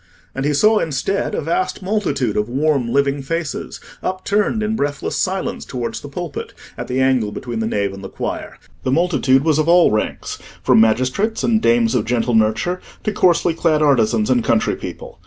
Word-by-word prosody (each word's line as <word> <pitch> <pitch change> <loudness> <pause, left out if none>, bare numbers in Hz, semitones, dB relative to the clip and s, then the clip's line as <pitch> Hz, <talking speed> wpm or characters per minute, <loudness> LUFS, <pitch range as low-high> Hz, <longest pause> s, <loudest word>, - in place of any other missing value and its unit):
And 135 +1 -3
he 150 - +1
saw, 215 +7 +4
instead, 160 +6 -1
a - - -1
vast 170 +5 -2
multitude 185 - -1
of 105 +2 0
warm, 135 -2 0
living 140 +1 +1
faces, 165 +2 -4 0.2
upturned 205 +4 0
in 215 +1 -1
breathless 145 -6 -2
silence 190 0 -2
towards 120 -3 -4
the 145 - -9
pulpit, 170 +2 -6 0.2
at - - -6
the 125 +1 -1
angle 130 -5 +2
between 115 +2 -5
the 110 - -1
nave 100 -3 -1
and 95 0 -10
the 95 - -6
choir. - - -5 0.2
The 130 - -1
multitude 140 -4 +2
was 155 -1 +2
of 155 +2 +1
all 175 0 +6
ranks, 110 0 -2 0.2
from - - +5
magistrates 130 - +1
and 220 -2 +2
dames 115 0 +3
of 120 -4 +1
gentle 120 +1 0
nurture 110 +12 +1 0.2
to 215 - -1
coarsely 175 -2 +3
clad 160 -2 +1
artisans 115 -5 +2
and 120 -2 +2
country - - +1
people. - - -9
140 Hz, 185 wpm, -19 LUFS, 115-175 Hz, 0.2 s, all